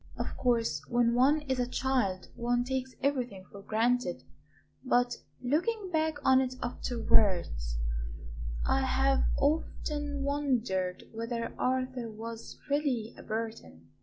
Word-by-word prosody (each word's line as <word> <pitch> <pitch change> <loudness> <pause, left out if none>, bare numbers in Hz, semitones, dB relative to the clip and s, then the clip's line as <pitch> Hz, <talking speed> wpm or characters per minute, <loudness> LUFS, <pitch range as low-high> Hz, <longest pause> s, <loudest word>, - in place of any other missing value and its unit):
Of - - -3
course, 230 - +1
when 240 -1 +3
one 275 +5 +4
is 265 -3 -1
a 245 - +1
child 245 -9 0
one 240 +1 +1
takes 260 0 -3
everything 245 -9 0
for 200 - -10
granted; 235 +4 +1 0.6
but 245 -2 +2 0.3
looking 370 - 0
back 315 -1 +2
on 260 0 +6
it 255 -1 -2
afterwards 185 - +1 0.9
I 270 - +3
have 265 +1 +3 0.2
often 290 -1 0
wondered 245 -11 0
whether 230 +1 -3
Arthur 255 -2 -1
was 225 +1 -7
really 280 -6 0
a - - -11
Burton." 220 - -5
245 Hz, 120 wpm, -31 LUFS, 225-270 Hz, 0.9 s, on